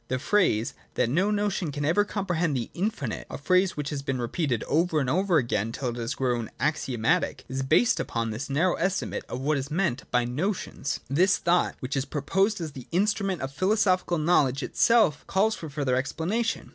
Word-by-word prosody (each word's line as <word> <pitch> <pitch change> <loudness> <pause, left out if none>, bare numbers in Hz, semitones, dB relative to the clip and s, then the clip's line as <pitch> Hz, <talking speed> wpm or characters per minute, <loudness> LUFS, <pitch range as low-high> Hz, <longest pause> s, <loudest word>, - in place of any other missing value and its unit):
The 130 - -1
phrase, 130 - +1 0.2
that 120 -1 +1
no 185 +8 +2
notion 205 -5 -1
can 145 +1 -3
ever 170 +7 +3
comprehend 175 -8 -1
the 120 - -4
Infinite, 175 - -3
a - - -5
phrase 185 +5 +2
which 150 0 -3
has 145 -2 -3
been 135 -2 -2
repeated 120 0 -1
over 160 0 +1
and 135 - -1
over 180 +4 +2
again 115 -4 0
till 125 +2 -3
it 120 - -5
has 120 +2 -3
grown 120 -4 -1
axiomatic, 150 +1 0
is 130 +1 -3
based 120 -3 +3
upon 115 -1 -2
this 110 +7 -5
narrow 160 +7 +2
estimate 185 +2 -1
of 125 - -4
what 145 +1 +1
is 135 +1 -5
meant 155 -6 -1
by 125 -1 +2
notions. 150 - -3
10.] 140 - -2
This 185 +2 +4
thought, 175 +1 +1
which 130 +3 -3
is 135 0 0
proposed 195 +9 0
as 160 -3 -4
the 130 -3 -10
instru 200 +3 +1
ment 185 -4 -2
of 135 +1 -4
philosophic 185 +2 +2
knowledge, 150 -4 +2
itself 220 -11 +3
calls 210 +3 +2
for 160 - -7
further 140 -3 0
explanation. 170 - -1
150 Hz, 195 wpm, -26 LUFS, 130-185 Hz, 0.2 s, This